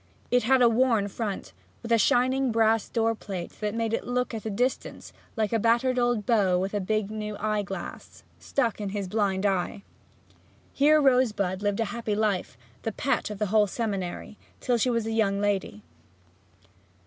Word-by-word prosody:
It 245 0 +4
had 255 +2 +4
a - - +7
worn 230 -3 +2
front, 205 -1 -5 0.3
with 235 - -6
a 230 - +5
shining 255 +4 +2
brass 225 -1 +2
door 225 0 +1
plate 190 -5 -6
that 210 0 -2
made 230 -1 -1
it - - -1
look 250 0 -1
at 220 -1 -5
a - - -1
distance 245 +6 -2 0.2
like 220 -2 -1
a 225 - +2
battered 240 +3 +2
old 240 -4 +1
beau 195 -6 +3
with 190 +3 -2
a 205 - 0
big 215 +1 -1
new 210 -1 -5
eye 215 0 0
glass 195 -1 -8 0.2
stuck 235 -6 -1
in 205 - -3
his 200 -2 -3
blind 200 -1 0
eye. 195 +1 -1 0.9
Here 305 +2 +5
Rosebud 225 -9 +2
lived 205 0 0
a - - +1
happy 230 -3 -2
life, 205 - -1 0.2
the 225 - -2
pet 245 +1 -1
of 210 - -6
the 210 - 0
whole 210 -1 +5
seminary, 200 -2 -4 0.2
till 245 -2 0
she 250 - +2
was 230 -2 0
a 225 - -2
young 205 -3 +1
lady. 200 - -1
220 Hz, 185 wpm, -27 LUFS, 200-235 Hz, 0.9 s, a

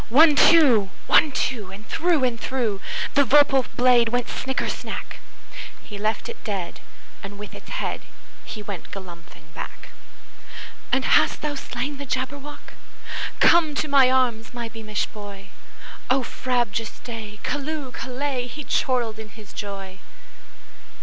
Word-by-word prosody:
One, 300 +5 +7
two! 265 - +6 0.2
One, 305 - +5
two! 235 -7 -1
And 205 +3 -11
through 330 -4 +1
and 240 -3 0
throughThe 235 -7 -1 0.4
vorpal 275 -2 +5
blade 245 -2 +5
went 245 0 0
snicker 265 +1 -2
snack! - - -5 0.6
He 205 -2 -8
left 215 +2 -1
it 470 - -9
dead, 195 -6 -4 0.4
and 200 +1 -8
with 210 0 -9
its - - -11
headHe 210 -2 -6
went 195 -4 -6
galumphing 180 -3 -11
back."And 265 0 -7
hast - - +4
thou 300 -1 -1
slain 275 0 -4
the 280 0 -7
Jabberwock? 275 +3 -5 0.7
Come 320 -3 +5
to 305 - 0
my 275 -3 +6
arms, 245 -3 +1
my 235 -1 -4
beamish 215 -2 -3
boy!O 205 +5 -5
frabjous 240 -4 -1
day! 220 -3 -8
Callooh! 290 -2 -3
Callay!"He 260 +1 -4
chortled 240 -5 0
in 220 -1 -8
his 210 -1 -14
joy. 195 -2 -6
245 Hz, 125 wpm, -24 LUFS, 210-275 Hz, 0.7 s, One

